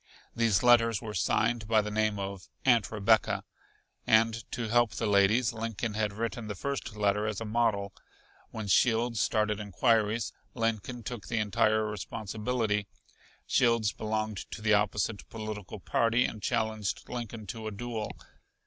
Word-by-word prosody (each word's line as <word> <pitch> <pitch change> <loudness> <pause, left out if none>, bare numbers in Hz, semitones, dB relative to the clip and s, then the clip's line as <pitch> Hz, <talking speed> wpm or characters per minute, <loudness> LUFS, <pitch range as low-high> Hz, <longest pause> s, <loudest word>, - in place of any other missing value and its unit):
These 115 -3 +2
letters 115 -3 +5
were 110 -2 -6
signed 110 +1 +1
by 110 -1 +3
the 105 - -4
name 110 -1 +1
of 100 -2 -6 0.2
"Aunt 120 -5 +4
Rebecca," 110 +1 +2 0.6
and 115 +1 +3
to 120 -2 -3
help 120 -2 +3
the 115 - -2
ladies 105 +5 +3
Lincoln 115 0 -3
had 105 -1 0
written 115 +1 -4
the 105 - -4
first 140 0 -4
letter 105 0 +1
as 105 -2 -2
a 115 - -5
model. 105 -3 0 0.6
When 110 -1 -6
Shields 115 +3 +3
started 105 0 +1
inquiries, 110 +2 +1 0.2
Lincoln 115 +1 -2
took 115 -1 -6
the 115 - -2
entire 110 +1 +2
responsibility. 105 +1 -2 0.6
Shields 115 -4 +3
belonged 110 -1 -2
to 105 - -8
the 110 -1 +4
opposite 105 0 0
political 110 -2 -6
party 115 +5 +2
and 110 - -5
challenged 110 0 -1
Lincoln 115 -3 -6
to 110 +3 -6
a - - -3
duel. 115 +1 -4
110 Hz, 150 wpm, -29 LUFS, 105-115 Hz, 0.6 s, letters